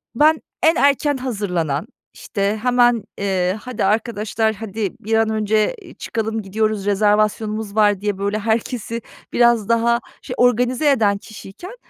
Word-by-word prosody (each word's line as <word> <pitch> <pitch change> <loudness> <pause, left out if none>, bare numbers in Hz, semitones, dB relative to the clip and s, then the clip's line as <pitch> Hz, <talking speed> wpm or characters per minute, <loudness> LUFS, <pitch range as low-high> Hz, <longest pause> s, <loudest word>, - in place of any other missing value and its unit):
ben 310 +4 +4 0.2
en 320 +1 +5
erken 285 0 +2
hazırlanan, 190 - -2 0.3
işte, 205 0 -2
hemen, 245 -3 +3
eee: 190 -1 0
"Hadi 240 -4 -3
arkadaşlar, 220 +1 0
hadi, 210 -1 -4
bir 220 +2 -4
an 220 0 +2
önce 215 - +1
i 350 -4 -14
çıkalım, 225 0 -3
gidiyoruz, 215 0 -1
rezervasyonumuz 210 +1 +1
var." 205 -3 +3
diye, 205 -2 -1
böyle, 200 +2 -1
herkesi 230 +1 -2 0.3
biraz 235 -3 +3
daha, 235 +1 +3 0.2
şey, - - -6
organize 245 +4 +3
eden 210 -6 +2
kişiyken 215 - -11
220 Hz, 135 wpm, -20 LUFS, 205-240 Hz, 0.3 s, en